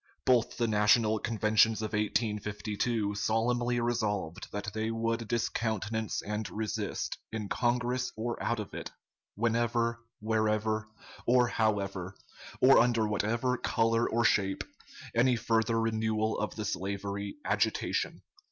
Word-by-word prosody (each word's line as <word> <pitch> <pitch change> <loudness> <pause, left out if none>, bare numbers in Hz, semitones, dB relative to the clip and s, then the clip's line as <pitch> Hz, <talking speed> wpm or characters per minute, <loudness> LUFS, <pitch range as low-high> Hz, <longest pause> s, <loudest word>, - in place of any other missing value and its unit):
Both 125 -2 +3
the 120 - +1
National 110 +1 +4
Conventions 110 0 +2
of 110 - -4
1852 105 0 -1
solemnly 120 +3 +1
resolved 110 -6 -2
that 105 +1 -4
they 110 0 -1
would 115 0 -1
discountenance 110 -1 -1
and 105 +1 -3
resist, 110 -3 -3
in 110 -2 -4
Congress 125 +2 0
or 120 +2 -3
out 120 -1 0
of 105 - -6
it, - - -5 0.5
whenever, 115 +1 +1 0.2
wherever, 110 0 0 0.4
or 125 0 +4
however, 100 -5 -1 0.4
or 135 +1 +7
under 115 -2 +3
whatever 115 +5 0
color 115 +1 +1
or 120 +1 +1
shape, 95 -3 +2 0.5
any 125 +2 +4
further 115 0 +1
renewal 110 -1 0
of 105 - -3
the 110 - -4
slavery 100 +1 -3
agitation. - - 0
110 Hz, 120 wpm, -30 LUFS, 105-115 Hz, 0.5 s, or